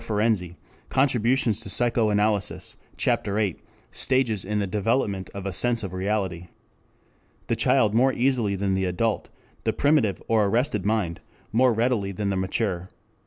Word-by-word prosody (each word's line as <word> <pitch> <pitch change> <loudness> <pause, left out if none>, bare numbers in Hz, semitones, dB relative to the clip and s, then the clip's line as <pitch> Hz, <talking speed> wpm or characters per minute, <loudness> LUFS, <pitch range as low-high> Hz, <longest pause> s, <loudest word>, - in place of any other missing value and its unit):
Ferenczi, 105 -5 0 0.3
Contributions 125 -4 +2
to 100 - -7
Psychoanalysis, 105 -3 +1 0.2
Ch. - - +1
VIII, 100 -3 -1 0.3
Stages 125 -7 0
in 105 +2 -2
the 100 - 0
Development 100 -1 -1
of 100 - -5
the 100 -1 -3
Sense 120 +4 +1
of 95 -2 -5
Reality.] 95 -3 -2 1.0
the - - 0
child 105 -1 +3
more 130 +4 +4
easily 120 -6 +1
than 95 0 -1
the 95 0 0
adult, 105 +5 -1 0.3
the - - 0
primitive 140 -9 +2
or 110 -2 +3
arrested 120 +3 0
mind 105 -7 0 0.3
more 125 +3 +4
readily 115 -3 0
than 100 +1 -2
the - - -1
mature. 95 -1 -2
105 Hz, 145 wpm, -25 LUFS, 95-115 Hz, 1.0 s, more